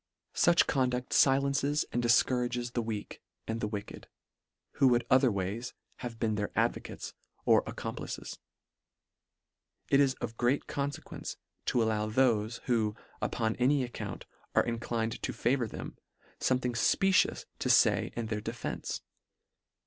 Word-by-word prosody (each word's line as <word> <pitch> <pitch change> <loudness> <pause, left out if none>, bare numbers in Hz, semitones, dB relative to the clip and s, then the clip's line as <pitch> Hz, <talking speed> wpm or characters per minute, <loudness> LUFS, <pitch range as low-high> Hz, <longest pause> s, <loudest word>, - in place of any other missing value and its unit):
Such 170 -1 +5
conducl 125 -3 0
filences 140 +2 +3
and 120 - 0
difcou 120 +2 +4
rages 120 0 -2
the 120 - -1
weak, 110 -2 -5 0.3
and 115 +1 -2
the - - 0
wicked, 105 -1 -6 0.7
who 135 - +5
would 120 -1 +3
otherways 115 -3 +2 0.2
have 120 -2 -6
been 110 -2 +1
their 105 -1 -1
advocates - - -1 0.3
or - - +6
ac - - -6
complices. - - -6 1.5
It 140 - +5
is 135 -2 +4
of 115 - -6
great 125 +4 +1
confequence, 140 0 -4 0.3
to 120 - +3
allow 110 -1 0
thofe, 115 -2 +2
who, 110 -4 +1 0.3
upon 110 -1 0
any 130 +2 +3
account, 120 - -6 0.3
are - - +5
in 115 -1 -2
clined 115 -1 -2
to - - -2
favour 120 0 +1
them, - - -8 0.4
fomething 125 -1 +1
fpecious 195 - +3
to - - -1
fay - - +4
in 115 - -2
their 110 -1 -3
defence. 115 +2 -4
120 Hz, 140 wpm, -31 LUFS, 110-130 Hz, 1.5 s, or